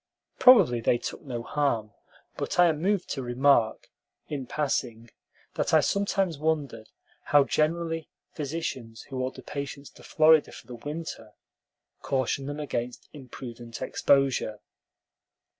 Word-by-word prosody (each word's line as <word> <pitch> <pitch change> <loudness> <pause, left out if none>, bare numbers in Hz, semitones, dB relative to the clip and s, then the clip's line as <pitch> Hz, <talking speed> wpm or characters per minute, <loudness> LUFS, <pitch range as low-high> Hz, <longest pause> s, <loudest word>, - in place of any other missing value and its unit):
Probably 220 - +7
they 120 - +3
took - - -6
no 120 -5 -5
harm; 120 -7 -1 0.4
but - - -4
I 175 - +7
am 155 -1 -2
moved 195 0 +1
to 135 - -3
remark, 120 -2 +2 0.4
in 140 -4 -5
passing, 120 -6 -2 0.4
that - - +1
I - - +7
sometimes 195 -5 0
wondered 145 -8 -2 0.4
how 145 -1 +5
generally 165 +2 -1 0.2
physicians 135 -7 -5
who 130 -2 -5
order 130 +1 -4
patients 140 0 -6
to - - -17
Florida 155 -1 +4
for - - -12
the 125 - -10
winter 145 -3 -7 0.7
caution 135 0 -1
them 145 +1 -5
against 125 -4 -4
imprudent 120 -4 -9
exposure. 135 -6 +1
140 Hz, 125 wpm, -27 LUFS, 120-155 Hz, 0.7 s, Probably